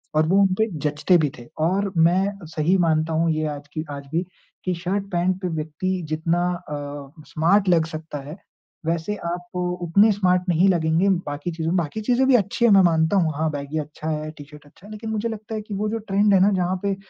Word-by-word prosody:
और 155 +1 +4
वो 190 +4 +3
उनपे 195 +3 +2 0.2
जचते 150 +4 +3
भी 155 -3 +1
थे 120 - -11 0.2
और 195 +3 0
मैं 190 +3 +2
सही 160 +4 +1
मानता 160 -2 +1
हूँ 165 +1 +2
ये 155 0 -1
आज 145 -1 -6
की 155 - -3
आज 140 -1 -7
भी 170 +2 0 0.4
कि 185 - +1
शर्ट 185 +4 -2
पैंट 180 +1 +1
पे 185 - -1
व्यक्ति 160 +4 -3
जितना 165 +3 0 0.3
अ, 145 +1 -7
स्मार्ट 190 +6 +2
लग 165 -3 +4
सकता 155 -1 -7
है, 155 - -7 0.5
वैसे 165 +5 -1
आप 175 +1 -5 0.3
उतने 200 +6 +4
स्मार्ट 185 -3 +2
नहीं 175 +3 +4
लगेंगे 170 +1 +2 0.2
बाकी 145 +4 -4
चीजों 160 -1 -3
में 185 - +2
बाकी 170 +5 -2
चीज़ें 245 +4 +2
भी 265 - +6
अच्छी 210 +2 +1
है 235 - +5
मैं 195 -1 +7
मानता 160 +1 +3
हूँ। 165 -4 +2
हाँ, 160 +2 0
बैगी 145 +1 -4
अच्छा 155 +1 -6
है, 155 0 -3
टी-शर्ट 150 -1 -13
अच्छा 145 +6 -19
है - - -12
लेकिन 215 +1 -6
मुझे 220 +1 -1
लगता 220 0 -6
है 215 - -3
कि 210 0 -8
वो 210 +2 -1
जो 225 - -2
ट्रेंड 205 -1 +2
है 195 - +6
ना? 195 +3 +4
जहाँ 185 -1 0
पे 200 -1 0
175 Hz, 220 wpm, -23 LUFS, 155-195 Hz, 0.5 s, मैं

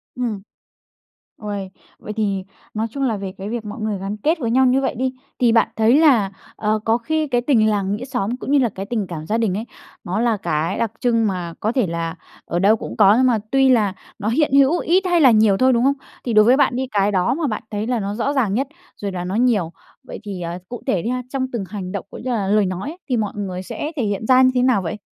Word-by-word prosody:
Ừm. 230 -6 -3 1.0
Ôi, 200 -2 -4 0.3
vậy 210 - -7
thì 200 -3 -1 0.3
nói 220 +1 -1
chung 275 +1 -3
là 225 -5 0
về 195 -1 -5
cái 195 +2 -6
việc 230 -1 -4
mọi 210 - -7
người 215 -2 -2
gắn 200 +2 -4
kết 320 - 0
với 230 -3 -1
nhau 260 +2 +4
như 260 +2 +3
vậy 265 - -1
đi, 260 +2 -1 0.3
thì 240 -2 +4
bạn 230 - +3
thấy 225 +4 +4
là, 235 -11 +4 0.2
ờ, 215 0 0
có 225 +1 +3
khi 310 +5 -1
cái 245 -2 +1
tình 240 -5 +3
làng 200 -1 0
nghĩa 245 +4 -6
xóm 245 -3 -2
cũng 270 - -5
như 290 - +5
là 245 - +2
cái 195 -1 -7
tình 215 -4 -2
cảm 155 -3 -6
gia 220 - 0
đình 220 -5 +1
ấy, 225 - -4 0.4
nó 185 +4 -2
là 230 -3 +2
cái 160 -1 -1
đặc 230 -3 -1
trưng 230 -2 +2
mà 180 -4 -3
có 220 - 0
thể 245 -7 +1
là 165 0 -3 0.3
ở 175 - -2
đâu 205 +3 +5
cũng - - -7
có 205 -1 +6
nhưng 255 - +4
mà 235 -3 +2
tuy 270 -1 +4
là 215 -6 +3 0.3
nó 210 - -3
hiện 290 +4 +1
hữu 280 +4 +5
ít 370 +3 +2
hay 350 -2 +3
là 260 -4 +7
nhiều 215 -3 +4
thôi, 260 0 +4
đúng 235 - +2
không? 275 +2 +4 0.3
Thì 240 - -1
đối 215 0 +6
với 255 +3 +5
bạn 275 -4 +3
đi 260 +1 -2
cái 205 0 +2
đó 185 -2 +1
mà 310 +1 -1
bạn 215 - -3
thấy 210 +2 -3
là 245 -2 0
nó 200 0 -3
rõ 275 +5 -1
ràng 240 -8 +1
nhất 265 +6 0 0.3
rồi 200 - -2
là 180 -1 -4
nó 185 +3 -3
nhiều, 220 -9 +2 0.3
vậy - - -8
thì, 195 -3 -6
à, 170 +1 -4
cụ 245 - -7
thể 180 - +1
đi 230 - -3
ha, 250 0 -1
trong 260 -1 -2
từng 235 -5 -3
hành 190 -3 -5
động 200 -1 -4
cũng - - -10
như 260 - -3
là 205 -5 -1
lời 210 0 +3
nói 185 +8 -3
ấy, 330 - -9
thì 250 - +1
mọi 210 -3 -2
người 185 -3 -4
sẽ 295 +10 -5
thể 260 - 0
hiện 205 +1 -2
ra 255 0 +6
như 255 - +6
thế 250 - +3
nào 250 -5 +3
vậy? 175 +3 -4
220 Hz, 270 wpm, -20 LUFS, 200-255 Hz, 1.0 s, là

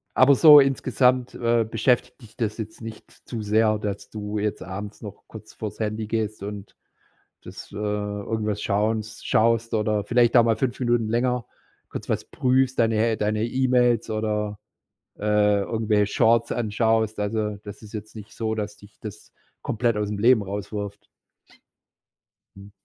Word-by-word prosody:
Aber 135 +2 +6
so 150 +1 +9
insgesamt, 130 -2 +2
äh, 115 -1 +2
beschäftigt 120 +4 0
dich 110 -3 -15
das 110 -3 -2
jetzt 110 +1 -7
nicht 110 -1 -9
zu 115 -3 -8
sehr, 110 +1 +2
dass 105 -1 -5
du 105 0 -4
jetzt 105 0 -2
abends 100 +2 -7
noch 105 -3 -10
kurz - - -12
vor - - -5
das - - -18
Handy 110 0 -2
gehst 110 -2 -2
und 100 -1 -7 0.7
das, - - -10
äh - - -11
irgendwas 105 0 -2
schauns 110 +1 -1
schaust 115 +1 +2
oder 105 -1 0
vielleicht 120 +1 +3
auch 120 - +7
mal 115 -1 +3
5 130 -1 -2
Minuten 120 -3 +1
länger 125 +1 0 0.4
kurz - - -7
was - - -1
prüfst, 130 0 +1
deine 115 0 +2
deine 105 +1 0
E-Mails 125 -2 +2
oder, 105 -1 -2 0.6
äh, 105 -1 +2
irgendwelche 105 -1 0
Shorts 115 0 +3
anschaust. 110 -1 0
Also, 105 0 -1
das 105 -1 -9
ist 110 +1 -13
jetzt 110 0 -7
nicht 105 0 -10
so, 110 -1 -2
dass 105 -1 -4
dich 105 +1 -18
das 105 -1 -10 0.3
komplett 115 0 0
aus 105 -1 -1
dem 105 - -4
Leben 115 +1 +5
rauswirft? 100 +1 -6 1.5
Mhm. 100 +1 -13
110 Hz, 160 wpm, -24 LUFS, 105-115 Hz, 1.5 s, so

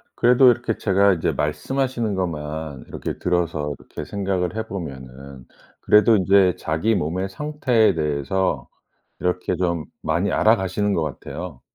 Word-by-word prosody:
그래도 125 +1 +6
이렇게 120 -1 -2
제가 100 0 +3
이제 85 - 0
말씀하시는 120 - -1
것만 80 -5 -4
이렇게 - - -5
들어서 85 -5 -1
이렇게 - - -8
생각을 95 -2 -2
해 110 0 -3
보면은 65 - -8 0.4
그래도 105 +2 +5
인제 95 -2 +4
자기 80 +9 0
몸의 90 +3 -2
상태에 130 -2 +1
대해서 75 +5 -1 0.5
이렇게 90 0 -1
좀 85 -3 -1 0.2
많이 85 +6 0
알아가시는 105 -2 +2
것 85 - 0
같아요. 75 0 -6
90 Hz, 320 characters per minute, -22 LUFS, 80-105 Hz, 0.5 s, 그래도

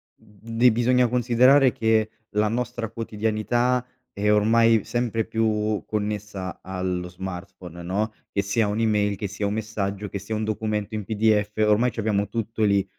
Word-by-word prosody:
di 115 +4 0
bisogna 125 +2 +3
considerare 125 +3 +4
che 110 -1 +1 0.2
la 105 +1 +2
nostra 120 0 -3
quotidianità 115 +3 0 0.3
è 105 +1 0
ormai 115 +1 +4
sempre 115 -1 -1
più 110 -1 0
connessa 105 -3 -4
allo 90 -1 -3
smartphone 90 -1 -8
no, 100 +5 -1 0.2
che 100 - +1
sia 105 +3 +1
un'email, 105 -1 +1
che 100 +1 -3
sia 105 +1 -4
un 100 - 0
messaggio, 105 -2 -3
che 100 - -4
sia 100 +3 -6
un 110 0 -1
documento 110 0 -2
in 105 - -3
PDF. 105 0 +2
Ormai 110 +3 +3
c'abbiamo 105 -3 -1
tutto 115 +1 -3
lì. 100 -2 +3
110 Hz, 150 wpm, -24 LUFS, 100-115 Hz, 0.3 s, considerare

